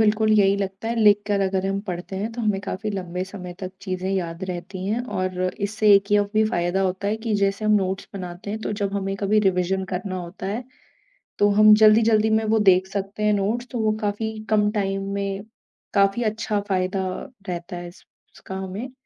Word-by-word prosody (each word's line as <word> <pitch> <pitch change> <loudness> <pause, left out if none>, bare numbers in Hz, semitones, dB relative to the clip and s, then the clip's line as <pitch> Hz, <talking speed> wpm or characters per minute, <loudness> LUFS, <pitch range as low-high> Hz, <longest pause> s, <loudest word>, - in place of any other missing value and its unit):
बिल्कुल 215 0 +3
यही 200 -1 +4
लगता 195 +2 -4
है। 235 - -1
लिखकर 205 -2 +4
अगर 190 0 0
हम 195 0 -1
पढ़ते 180 +1 -5
हैं 210 +4 -2
तो 240 - -5
हमें 210 -3 0
काफ़ी 200 +2 -4
लंबे 180 -2 -3
समय 185 -2 -8
तक 185 -1 -4
चीज़ें 185 -2 -3
याद 175 -2 -2
रहती 185 +1 -6
हैं 220 +4 0 0.2
और 185 -1 -2 0.2
इससे 210 +1 +3
एक 200 +1 +2
ये 205 - +6
भी 220 - +4
फ़ायदा 175 +3 0
होता 190 +2 -1
है 215 - 0
कि 220 -2 0
जैसे 200 +1 0
हम 215 - +3
नोट्स 190 0 -2
बनाते 180 +1 -6
हैं 220 +1 -4
तो 215 - -3
जब 200 0 -1
हमें 195 -1 -2
कभी 205 +2 +2
रिविज़न 190 +1 0
करना 185 +1 -3
होता 175 +2 -7
है, 220 +6 -3 0.7
तो 205 - +5
हम 215 +1 +7
जल्दी-जल्दी 220 0 +5
में 220 0 +2
वो 220 +1 +2
देख 185 +1 +3
सकते 195 +1 -4
हैं 210 0 +3
नोट्स। 210 +5 0
तो 245 - -3
वो 215 -1 +2
काफ़ी 215 +1 -2
कम 210 -1 +3
टाइम 195 -2 -1
में 200 0 -3 0.5
काफ़ी 200 +3 +3
अच्छा 215 -1 -1
फ़ायदा 190 0 0 0.4
रहता 175 +1 -5
है 175 0 -6
इस 175 - -16 0.3
इसका 190 - -8
हमें। 195 +7 -5
200 Hz, 200 wpm, -23 LUFS, 190-215 Hz, 0.7 s, हम